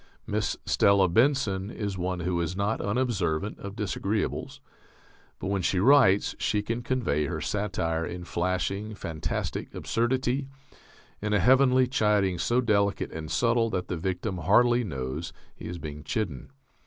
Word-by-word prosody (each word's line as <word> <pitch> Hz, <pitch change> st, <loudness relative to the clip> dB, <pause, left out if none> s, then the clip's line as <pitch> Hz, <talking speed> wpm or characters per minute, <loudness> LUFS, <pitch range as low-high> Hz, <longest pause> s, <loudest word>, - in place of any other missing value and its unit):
Miss -, -, -1 dB
Stella 100 Hz, -1 st, +4 dB
Benson 105 Hz, -2 st, +2 dB
is 100 Hz, -4 st, -4 dB
one 90 Hz, 0 st, -2 dB
who 85 Hz, 0 st, 0 dB
is 85 Hz, +2 st, -2 dB
not 100 Hz, +3 st, 0 dB
unobservant 100 Hz, -5 st, -1 dB
of 100 Hz, 0 st, -7 dB
disagreeables, 105 Hz, +1 st, -2 dB, 0.8 s
but -, -, -7 dB
when 100 Hz, -1 st, 0 dB
she 90 Hz, +1 st, +1 dB
writes 105 Hz, -4 st, +5 dB
she 105 Hz, -1 st, 0 dB
can 115 Hz, +3 st, -2 dB
convey 120 Hz, -, 0 dB
her -, -, -3 dB
satire 85 Hz, -6 st, -1 dB
in 90 Hz, +1 st, -5 dB
flashing, 95 Hz, +4 st, -2 dB
fantastic 80 Hz, -5 st, -4 dB
absurdity, 130 Hz, +3 st, 0 dB, 0.7 s
in 105 Hz, 0 st, -1 dB
a 105 Hz, -, +4 dB
heavenly 130 Hz, +1 st, +5 dB
chiding 105 Hz, -7 st, +1 dB
so 120 Hz, +7 st, +2 dB
delicate 100 Hz, -4 st, +1 dB
and 80 Hz, -1 st, -6 dB
subtle 115 Hz, +6 st, +2 dB
that 90 Hz, -4 st, -3 dB
the -, -, -1 dB
victim 95 Hz, +2 st, -3 dB
hardly 120 Hz, +8 st, +4 dB
knows 70 Hz, -, -4 dB, 0.2 s
he -, -, -8 dB
is 90 Hz, -, -5 dB
being 75 Hz, -2 st, -7 dB
chidden. 90 Hz, -, -3 dB
100 Hz, 145 wpm, -27 LUFS, 90-115 Hz, 0.8 s, writes